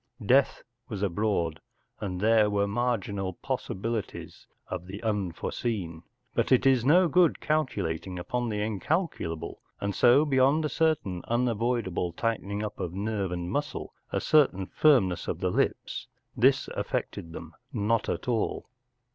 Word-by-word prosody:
Death 135 +5 +3 0.3
was 105 -3 -4
abroad, 95 -4 0 0.4
and 90 -3 -4
there 110 0 +4
were 100 0 +1
marginal 100 -4 -1
possibilities 110 +5 -4 0.2
of 90 -1 -5
the 100 +2 -7
unforeseen, 100 -3 -2 0.3
but - - 0
it 130 - +5
is 130 -3 +4
no 175 +7 +5
good 170 +1 +3
calculating 100 - -1
upon 120 +7 -2
the 105 -1 -1
incalculable, 105 - -2 0.2
and 100 0 -2
so 125 +8 +5
beyond 140 +2 +3
a - - 0
certain 150 - 0
unavoidable 115 -7 0
tighten¬ 115 +1 -2
ing 100 +1 -2
up 105 0 -5
of 85 -1 -3
nerve 100 -2 -2
and 90 0 -3
muscle, 145 - -3 0.2
a - - 0
certain 135 -11 +3
firmness 105 - +3
of - - -2
the - - 0
lips, - - -1 0.3
this - - +3
affected 85 - -3
them 85 0 -9 0.2
not 115 0 0
at - - -3
all. 120 +1 -1
105 Hz, 140 wpm, -28 LUFS, 95-125 Hz, 0.4 s, it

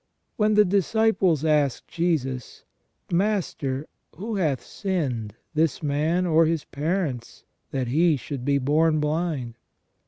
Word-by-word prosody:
When 215 0 +2
the 210 0 +6
disciples 195 -4 +2
asked 150 -4 +1
Jesus: 145 -8 -2 0.5
"Master, 170 -8 0 0.3
who 210 +5 -4
hath 150 -9 0
sinned, 130 - -3 0.2
this 155 -1 +1
man, 155 +5 +1
or 165 -1 +4
his 165 -2 -1
parents, 145 -5 -3 0.3
that 130 -3 -2
he 160 +3 +3
should 135 0 -6
be 140 +1 +2
born 155 +4 +2
blind?" 150 -6 -2
155 Hz, 120 wpm, -25 LUFS, 140-180 Hz, 0.5 s, the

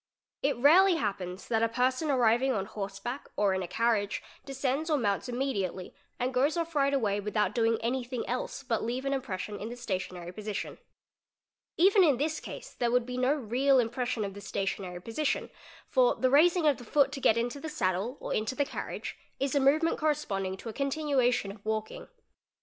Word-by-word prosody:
It 280 -2 +1
rarely 345 +8 +6
happens 195 - -3
that 225 -2 +1
a 230 - +3
person 255 +6 0
arriving 250 0 +3
on 195 -4 -1
horse 195 -1 -6
back 245 +7 -6
or 200 -2 +2
in 190 - -1
a 180 - -4
carriage 205 +1 0 0.2
descends 275 +3 -2
or 305 - +3
mounts 205 -1 -1
immediately 205 -8 -2 0.3
and 255 +1 -1
goes 280 +6 +2
off 335 0 -2
right 280 -2 +2
away 215 -7 +1
without 210 -1 0
doing 230 -1 +2
anything 245 0 -2
else 250 +2 -3
but 235 -4 -1
leave 250 +4 -3
an 275 - 0
impres 260 -8 -3
'sion 205 +2 -6
in 215 - -5
the 240 - -6
stationary 185 -6 -4
position. 210 +2 -5 1.0
Even 385 +3 +6
in 290 -7 +4
this 300 +3 -1
case - - -9
there 240 - 0
would 245 0 +2
be 250 0 -5
no 255 +1 +2
real 265 +1 +2
impression 240 -2 0
of 195 - -5
the 205 - -9
stationary 195 -3 -3
position 275 +7 -1 0.4
for - - +3
the 255 -1 +1
raising 340 +4 +5
of 290 -3 +4
the - - -10
foot 280 +4 +3
to 275 -1 -6
get 220 - +4
into 240 +4 -2
thé 320 - -4
saddle 195 +1 -1
or - - -4
into 220 +4 -1
the 285 - +1
carriage 295 - -6 0.2
is 275 -1 0
a 285 - +3
movement 305 +5 +3
corresponding 195 -11 -1
to 230 - -10
a 225 - -4
continuation 270 -6 +1
of 200 0 -14
walking. 220 0 -3
245 Hz, 195 wpm, -29 LUFS, 210-275 Hz, 1.0 s, rarely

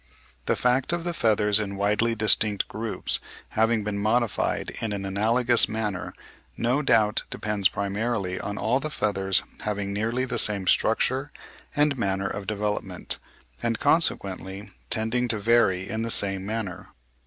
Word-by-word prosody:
The - - +2
fact 125 +5 +1
of 175 -1 -1
the 175 0 -2
feathers 105 -6 +2
in 100 -2 -3
widely 105 +4 +1
distinct 110 -2 +2
groups 110 0 +1 0.3
having 110 0 +1
been 100 -1 -3
modified 115 +2 0
in 110 -2 -2
an 100 -1 -4
analogous 115 +6 +3
manner 105 -4 -3 0.4
no 125 +5 +1
doubt 110 -6 +3
depends 105 -3 0
primarily 100 -1 -2
on 100 +1 -5
all 125 +4 +1
the 155 +3 -4
feathers 95 -8 +1 0.2
having 100 -1 -2
nearly 115 +5 -1
the 125 -3 +1
same 100 -3 +2
structure 130 +8 +1 0.4
and 145 -2 +2
manner 95 -2 0
of 100 0 -5
development, 105 -1 -2 0.4
and 115 -1 -1
consequently 100 - 0 0.2
tending 115 +3 0
to 115 - +1
vary 100 -4 +2
in 110 0 -3
the 115 - -2
same 95 -3 +1
manner. 110 -5 -4
110 Hz, 145 wpm, -25 LUFS, 100-115 Hz, 0.4 s, analogous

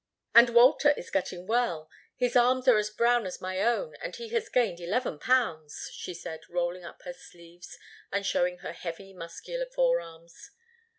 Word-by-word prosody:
"And 235 +1 +8
Walter 245 +5 +6
is - - -9
getting 180 -1 -2
well. 215 -8 0 0.3
His 245 -1 -1
arms 250 +1 +3
are 240 -4 +7
as 210 0 -1
brown 235 0 +2
as 180 - -7
my 185 +1 -3
own 240 - 0
and - - -5
he 470 -2 -8
has 460 -1 -2
gained 220 -9 +1
eleven 175 - -2
pounds," 165 -13 0
she 180 - -7
said, 160 -1 -7
rolling 175 +1 -2
up 170 - -12
her 265 - -6
sleeves 175 -9 -14 0.3
and 200 0 -1
showing 180 -1 +1
her - - -4
heavy, 190 +3 -8
muscular 190 - -6
forearms. - - -2
210 Hz, 170 wpm, -28 LUFS, 175-255 Hz, 0.3 s, And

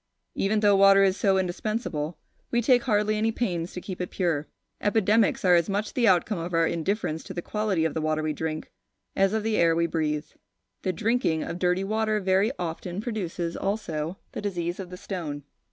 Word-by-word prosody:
Even 210 +2 +1
though 205 -1 +5
water 195 0 +7
is 190 -1 +3
so 195 -1 +2
indispensable, 180 -4 -2 0.3
we 240 - +1
take 245 +1 +4
hardly 210 -2 +2
any 220 +1 +1
pains 180 -8 -2
to - - -6
keep 185 0 -6
it 180 - -3
pure. 165 -5 -1 0.3
Epidemics 210 0 +2
are 180 - +6
as 170 0 +3
much 205 +2 -2
the 240 -3 +2
outcome 185 +1 +3
of 170 +1 -3
our 165 0 +4
indifference 165 -1 -1
to 190 - -8
the 175 - -2
quality 210 -6 0
of 160 - 0
the 160 - -2
water 155 0 0
we 155 0 0
drink, 155 0 -4 0.4
as 195 0 +3
of 220 0 -1
the 220 -1 0
air 165 -1 +4
we 170 0 +2
breathe. 155 -2 -1 0.6
The 185 - 0
drinking 215 -4 0
of 170 - -5
dirty 180 +1 +1
water 215 +1 0
very 190 +3 +2
often 175 +2 -4
produces 180 -7 -3
also 175 -4 -2
the - - -5
disease 175 -3 -3
of 185 -2 -6
the 180 - -8
stone. 160 -7 -5
185 Hz, 200 wpm, -26 LUFS, 165-210 Hz, 0.6 s, water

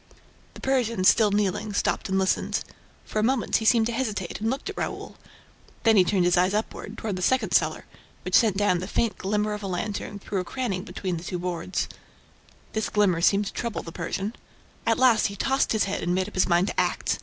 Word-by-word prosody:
The - - -11
Persian, 235 -7 0
still 215 +3 +5
kneeling, 205 +1 0
stopped 200 +1 0
and 190 - +1
listened. 190 -1 0 0.4
For 215 - -2
a - - +1
moment, 255 +1 +2
he 220 - -4
seemed 225 0 +5
to 235 - -1
hesitate 215 -7 -3
and 220 - +1
looked 265 +8 -3
at 410 - -5
Raoul; - - -4 0.7
then 225 -1 +5
he 190 - +7
turned 180 0 +1
his 175 0 +3
eyes 185 +3 +3
upward, 215 - -4
toward 205 -4 -3
the - - -5
second 260 +7 +1
cellar, - - +1 0.4
which - - -6
sent 215 -5 +4
down 205 -3 +2
the 185 - -5
faint 230 +2 -1
glimmer 210 +2 0
of 210 - -5
a 200 - -4
lantern, 200 +2 -3
through 200 0 -3
a - - -1
cranny 195 -1 -3
between 185 -4 -4
two 180 +2 -4
boards. 175 0 -3 0.9
This 220 -1 -1
glimmer 195 -5 +2
seemed 200 +3 +3
to - - -5
trouble 235 -2 -3
the 165 - -8
Persian. 200 +6 -3 0.5
At 225 - +3
last, 250 -4 +4
he 200 - -7
tossed 270 +6 +1
his 220 - +2
head 195 - -2
and 175 +1 0
made 185 0 0
up 210 - -10
his 185 - +2
mind 175 +3 +3
to - - -2
act. - - 0
205 Hz, 220 wpm, -26 LUFS, 185-225 Hz, 0.9 s, he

